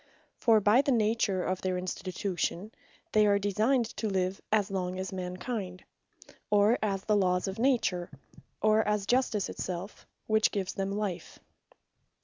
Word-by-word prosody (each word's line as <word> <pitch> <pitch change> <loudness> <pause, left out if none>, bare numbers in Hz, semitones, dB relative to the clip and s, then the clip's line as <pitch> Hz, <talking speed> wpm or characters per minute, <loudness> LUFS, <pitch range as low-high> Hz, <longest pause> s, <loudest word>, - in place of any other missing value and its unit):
For 225 -2 +5
by 210 +5 +5
the 280 - 0
nature 215 -5 +1
of 185 0 -2
their 185 -1 -1
Institution, 185 +1 -3 0.4
they 215 -1 +4
are 200 0 +4
designed 215 +6 +1
to 220 - -1
live, 190 0 -1
as 210 -2 +2
long 185 -1 -2
as 190 +1 -4
Man 180 -1 -4
kind, 185 -5 -5 0.7
or 210 +3 +4
as 195 -3 -1
the 210 - +2
Lawes 180 -2 +1
of 195 +2 -5
Nature, 225 -9 +1 0.5
or 215 0 +5
as 210 -2 0
Justice 240 -4 +1
it - - -9
selfe, 185 +2 -5 0.2
which 220 0 +3
gives 195 -2 -3
them 195 0 -2
life. 200 -4 -4
200 Hz, 155 wpm, -29 LUFS, 185-215 Hz, 0.7 s, For